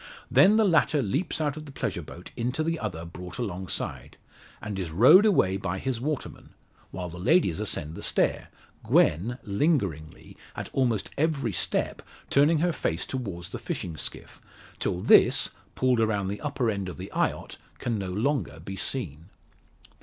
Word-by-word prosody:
Then 210 Hz, +3 st, +6 dB
the 220 Hz, -, +4 dB
latter 165 Hz, -4 st, +3 dB
leaps 135 Hz, -, -1 dB
out 150 Hz, -1 st, -1 dB
of 155 Hz, -1 st, -8 dB
the -, -, -9 dB
pleasure 90 Hz, -, -3 dB
boat 85 Hz, +3 st, -11 dB
into 125 Hz, +6 st, -1 dB
the 165 Hz, 0 st, -1 dB
other 85 Hz, -, -4 dB
brought 90 Hz, +2 st, -9 dB
alongside, 95 Hz, -6 st, -4 dB, 0.4 s
and 105 Hz, -2 st, -5 dB
is 90 Hz, -3 st, -3 dB
rowed 125 Hz, -, +7 dB
away 95 Hz, -, +3 dB
by 95 Hz, -1 st, -3 dB
his 125 Hz, +2 st, -3 dB
waterman; 150 Hz, 0 st, -5 dB, 0.3 s
while 90 Hz, -1 st, -5 dB
the 85 Hz, +1 st, -9 dB
ladies 95 Hz, -, +3 dB
ascend 80 Hz, -7 st, -2 dB
the -, -, -8 dB
stair -, -, 0 dB, 0.4 s
Gwen, 105 Hz, +11 st, +2 dB
lingeringly, 100 Hz, -, -1 dB, 0.2 s
at -, -, -6 dB
almost 120 Hz, -7 st, 0 dB
every 145 Hz, -7 st, +1 dB
step, -, -, -1 dB, 0.3 s
turning 145 Hz, +4 st, +5 dB
her 175 Hz, 0 st, +2 dB
face 80 Hz, -, -2 dB
towards 95 Hz, -10 st, -5 dB
the -, -, -6 dB
fishing 85 Hz, -, -4 dB
skiff, -, -, -7 dB, 0.4 s
till 90 Hz, -, -1 dB
this, -, -, +5 dB, 0.2 s
pulled 130 Hz, -2 st, +2 dB
around 105 Hz, -4 st, +1 dB
the 100 Hz, -, -5 dB
upper 135 Hz, -6 st, 0 dB
end 100 Hz, -3 st, -3 dB
of 90 Hz, -, -8 dB
the 95 Hz, +2 st, -8 dB
eyot, -, -, -1 dB, 0.2 s
can 115 Hz, -3 st, -2 dB
no 95 Hz, -2 st, -4 dB
more 140 Hz, +7 st, -1 dB
be 95 Hz, -, -7 dB
seen. 90 Hz, -, -2 dB
110 Hz, 165 wpm, -27 LUFS, 90-140 Hz, 0.4 s, rowed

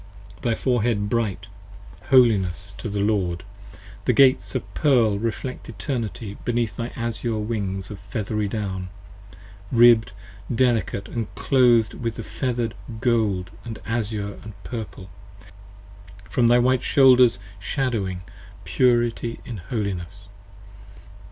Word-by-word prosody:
Thy 115 Hz, -2 st, +1 dB
forehead 115 Hz, -5 st, 0 dB
bright: 105 Hz, -5 st, -1 dB, 0.6 s
Holiness 105 Hz, -, +3 dB
to -, -, -4 dB
the 100 Hz, 0 st, -2 dB
Lord: 95 Hz, -4 st, 0 dB, 0.6 s
with 125 Hz, -, +3 dB
Gates 135 Hz, +1 st, +4 dB
of -, -, -4 dB
pearl 125 Hz, -8 st, +3 dB
5 100 Hz, +2 st, -3 dB
Reflects 115 Hz, +3 st, -4 dB
Eternity 115 Hz, -3 st, -4 dB
beneath 120 Hz, -2 st, -1 dB
thy 115 Hz, -, -3 dB
azure 115 Hz, -1 st, -2 dB
wings 100 Hz, -3 st, -3 dB
of 105 Hz, -, -8 dB
feathery 105 Hz, +1 st, -3 dB
down, 95 Hz, -3 st, -4 dB, 0.8 s
Ribb'd 115 Hz, -3 st, +6 dB, 0.4 s
delicate 115 Hz, -5 st, +1 dB, 0.3 s
& -, -, -19 dB
cloth'd 120 Hz, -5 st, +3 dB
with 115 Hz, -2 st, -4 dB
feather'd 120 Hz, -3 st, -2 dB, 0.3 s
gold 110 Hz, -7 st, +1 dB, 0.2 s
& 110 Hz, -, -8 dB
azure 110 Hz, -3 st, -3 dB
& -, -, -20 dB
purple, 105 Hz, -5 st, -7 dB, 1.2 s
From 120 Hz, +4 st, +2 dB
thy 120 Hz, +1 st, +6 dB
white 125 Hz, +1 st, +3 dB
shoulders 130 Hz, -5 st, +5 dB, 0.2 s
shadowing, 105 Hz, -6 st, -2 dB, 0.4 s
purity 120 Hz, -2 st, +1 dB
in 115 Hz, -, -6 dB
holiness! 100 Hz, -1 st, -5 dB
115 Hz, 115 wpm, -23 LUFS, 100-120 Hz, 1.2 s, Ribb'd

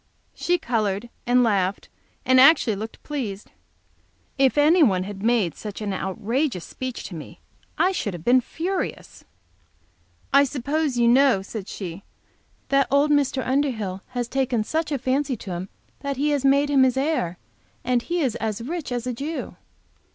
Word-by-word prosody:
She 355 Hz, 0 st, 0 dB
colored, 225 Hz, -, -1 dB, 0.2 s
and 245 Hz, +1 st, +4 dB
laughed, 200 Hz, -4 st, 0 dB, 0.4 s
and 260 Hz, 0 st, +5 dB
actually 260 Hz, -6 st, +6 dB
looked 220 Hz, +3 st, -8 dB
pleased. 225 Hz, -9 st, -5 dB, 0.8 s
If 270 Hz, 0 st, +2 dB
anyone 290 Hz, -, +4 dB
had 195 Hz, 0 st, -7 dB
made 220 Hz, -7 st, +2 dB
such 210 Hz, +3 st, -7 dB
an 205 Hz, -2 st, -3 dB
outrageous 205 Hz, -, -2 dB
speech 255 Hz, -2 st, -6 dB
to 180 Hz, -, -7 dB
me 155 Hz, -, -10 dB, 0.4 s
I 370 Hz, -, +3 dB
should 205 Hz, -, -3 dB
have 165 Hz, -, -9 dB
been 250 Hz, +1 st, +5 dB
furious. 360 Hz, +9 st, -4 dB, 1.1 s
"I 280 Hz, +1 st, +7 dB
suppose 285 Hz, +1 st, -1 dB
you 235 Hz, -1 st, +4 dB
know," 250 Hz, -5 st, +4 dB
said 205 Hz, 0 st, -7 dB
she, 185 Hz, -1 st, -7 dB, 0.7 s
"that 275 Hz, -1 st, +3 dB
old 285 Hz, +2 st, +3 dB
Mr. 275 Hz, -2 st, +1 dB
Underhill 235 Hz, -9 st, -1 dB
has 245 Hz, -2 st, -3 dB
taken 255 Hz, -3 st, 0 dB
such 315 Hz, +6 st, -2 dB
a 285 Hz, -, +1 dB
fancy 265 Hz, +1 st, 0 dB
to 195 Hz, -, -8 dB
him 180 Hz, +2 st, -5 dB, 0.3 s
that 280 Hz, -1 st, -4 dB
he 295 Hz, +2 st, +1 dB
has 285 Hz, -2 st, 0 dB
made 280 Hz, +1 st, +3 dB
him 275 Hz, -2 st, +5 dB
his 260 Hz, -1 st, +3 dB
heir; 265 Hz, -, 0 dB, 0.5 s
and 245 Hz, -1 st, +1 dB
he 345 Hz, +6 st, -2 dB
is 260 Hz, -7 st, 0 dB
as 220 Hz, -1 st, -3 dB
rich 320 Hz, +1 st, -4 dB
as 245 Hz, -1 st, -2 dB
a 250 Hz, -, -2 dB
Jew." 290 Hz, +7 st, -5 dB
255 Hz, 165 wpm, -24 LUFS, 210-280 Hz, 1.1 s, I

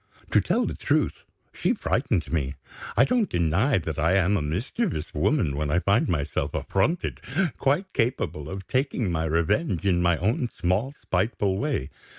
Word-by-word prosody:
To -, -, +5 dB
tell -, -, +1 dB
the -, -, -2 dB
truth, -, -, 0 dB, 0.3 s
she -, -, +1 dB
frightened 80 Hz, -2 st, -1 dB
me. 70 Hz, -4 st, -1 dB, 0.4 s
I -, -, +7 dB
don't 240 Hz, -4 st, +1 dB
deny 85 Hz, -, +2 dB
that 80 Hz, -4 st, -3 dB
I 85 Hz, +5 st, +3 dB
am 95 Hz, +1 st, +3 dB
a 95 Hz, -, +1 dB
mischievous 90 Hz, -, -2 dB
woman 80 Hz, -, +1 dB
when 75 Hz, 0 st, -1 dB
I 80 Hz, -, +2 dB
find 100 Hz, +5 st, +2 dB
myself 75 Hz, -4 st, -1 dB
affronted, 155 Hz, -, 0 dB, 0.4 s
quite 175 Hz, +8 st, +1 dB
capable 115 Hz, -, -1 dB
of 95 Hz, +1 st, -6 dB
taking 130 Hz, -6 st, 0 dB
my 80 Hz, -1 st, 0 dB
revenge 85 Hz, -, 0 dB
in 90 Hz, -3 st, +3 dB
my 85 Hz, -1 st, +3 dB
own 115 Hz, +7 st, 0 dB
small 105 Hz, +11 st, -1 dB
spiteful 95 Hz, +1 st, 0 dB
way. 135 Hz, -, -2 dB
95 Hz, 165 wpm, -26 LUFS, 80-125 Hz, 0.4 s, I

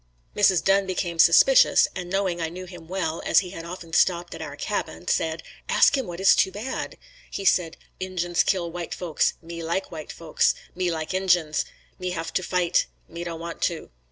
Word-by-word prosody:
Mrs. 190 Hz, -5 st, +4 dB
Dunn 195 Hz, 0 st, +3 dB
became 175 Hz, -2 st, -3 dB
suspicious -, -, +6 dB
and 175 Hz, -1 st, -5 dB
knowing 190 Hz, -2 st, -1 dB
I 165 Hz, -, -1 dB
knew 185 Hz, +2 st, -8 dB
him 175 Hz, -3 st, -12 dB
well, 170 Hz, -3 st, -2 dB
as -, -, +4 dB
he 180 Hz, -2 st, -8 dB
had 165 Hz, -3 st, -8 dB
often 170 Hz, -1 st, -9 dB
stopped 175 Hz, 0 st, +2 dB
at 165 Hz, -, -8 dB
our 145 Hz, -3 st, -6 dB
cabin, 180 Hz, +2 st, -4 dB
said 160 Hz, 0 st, 0 dB, 0.3 s
"Ask -, -, +5 dB
him 265 Hz, -4 st, -2 dB
what 175 Hz, 0 st, -7 dB
is 195 Hz, -, +6 dB
too 190 Hz, -, +2 dB
bad." 220 Hz, +7 st, -5 dB, 0.3 s
He 195 Hz, -, -5 dB
said, 170 Hz, -3 st, +2 dB, 0.2 s
"Injins 175 Hz, -2 st, 0 dB
kill 175 Hz, -3 st, 0 dB
white 175 Hz, -1 st, -5 dB
folks. 170 Hz, -4 st, 0 dB
Me 170 Hz, 0 st, -7 dB
like 170 Hz, +4 st, -2 dB
white 155 Hz, -3 st, -7 dB
folks. 165 Hz, -2 st, +1 dB, 0.2 s
Me 180 Hz, 0 st, -1 dB
like 160 Hz, 0 st, -3 dB
Injins. 175 Hz, -5 st, +1 dB, 0.3 s
Me 185 Hz, 0 st, -3 dB
have 165 Hz, -2 st, -4 dB
to -, -, +1 dB
fight. 180 Hz, -1 st, +1 dB, 0.2 s
Me 170 Hz, +1 st, -7 dB
don't 170 Hz, -1 st, -5 dB
want 170 Hz, 0 st, -7 dB
to." 170 Hz, -2 st, -9 dB
175 Hz, 195 wpm, -25 LUFS, 165-185 Hz, 0.3 s, suspicious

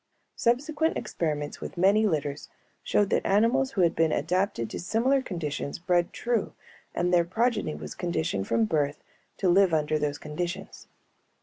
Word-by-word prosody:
Subsequent 295 Hz, +7 st, +1 dB
experiments 150 Hz, -3 st, -3 dB
with -, -, -7 dB
many 200 Hz, +4 st, +4 dB
litters 150 Hz, -5 st, -2 dB, 0.3 s
showed 205 Hz, -1 st, +1 dB
that -, -, +2 dB
animals 240 Hz, +7 st, +2 dB
who 195 Hz, -, +1 dB
had 170 Hz, -2 st, +3 dB
been 160 Hz, -1 st, +2 dB
adapted 180 Hz, -, 0 dB
to -, -, -5 dB
similar 240 Hz, +9 st, +1 dB
conditions 155 Hz, -, -4 dB
bred 175 Hz, 0 st, +1 dB
true 235 Hz, -3 st, -1 dB, 0.4 s
and 180 Hz, +1 st, 0 dB
their 175 Hz, -1 st, +5 dB
progeny 225 Hz, -, 0 dB
was 75 Hz, 0 st, -7 dB
conditioned 160 Hz, -, -2 dB
from 115 Hz, -1 st, +2 dB
birth 145 Hz, +3 st, -1 dB, 0.3 s
to 195 Hz, -, 0 dB
live 180 Hz, -1 st, +4 dB
under 155 Hz, 0 st, +1 dB
those 145 Hz, -1 st, -1 dB
conditions. 175 Hz, +5 st, -5 dB
175 Hz, 150 wpm, -27 LUFS, 150-215 Hz, 0.4 s, their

